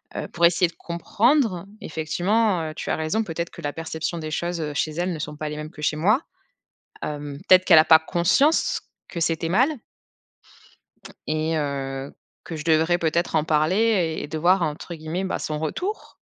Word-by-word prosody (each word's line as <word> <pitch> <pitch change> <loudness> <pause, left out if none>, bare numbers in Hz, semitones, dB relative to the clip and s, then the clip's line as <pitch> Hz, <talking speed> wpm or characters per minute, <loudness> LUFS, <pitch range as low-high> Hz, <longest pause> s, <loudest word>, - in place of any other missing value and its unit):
heu, - - -4
pour 170 0 +2
essayer 175 +1 +2
de 170 - -17
comprendre. 205 - +1 0.2
Effectivement, 180 +5 0
heu, - - -10
tu - - -5
as - - +1
raison, 160 +8 0
peut-être 170 -2 -4
que 170 - -11
la 145 -1 -3
perception 165 +1 -4
des 155 -1 -5
choses, 175 +2 -2
heu, 150 -1 -3
chez 155 - 0
elle 175 +3 -1
ne 160 - -6
sont 150 0 -5
pas 155 0 -4
les 150 - -5
mêmes 150 0 -6
que 150 - -10
chez 150 0 +1
moi. 210 - +3 0.8
Hem, 145 -1 -5
peut-être 185 0 +7
qu'elle 165 -4 +8
a 155 - +5
pas 160 -1 +8
conscience 175 - +2 0.3
que 170 - -5
c'était 165 0 0
mal 240 +9 +4 1.6
et 155 +1 0
heu, 135 -2 -3 0.3
que 165 - -7
je 150 - -6
devrais 160 +2 +3
peut-être 170 0 0
en 155 - +3
parler 155 +3 +2
et 200 -8 +1
et - - -5
de 155 - -4
«voir» 180 +3 +3
entre 155 +2 -4
guillemets 160 +4 -4
bah, 190 - -2
son 155 -1 -3
retour? 365 - -4
165 Hz, 195 wpm, -24 LUFS, 155-180 Hz, 1.6 s, qu'elle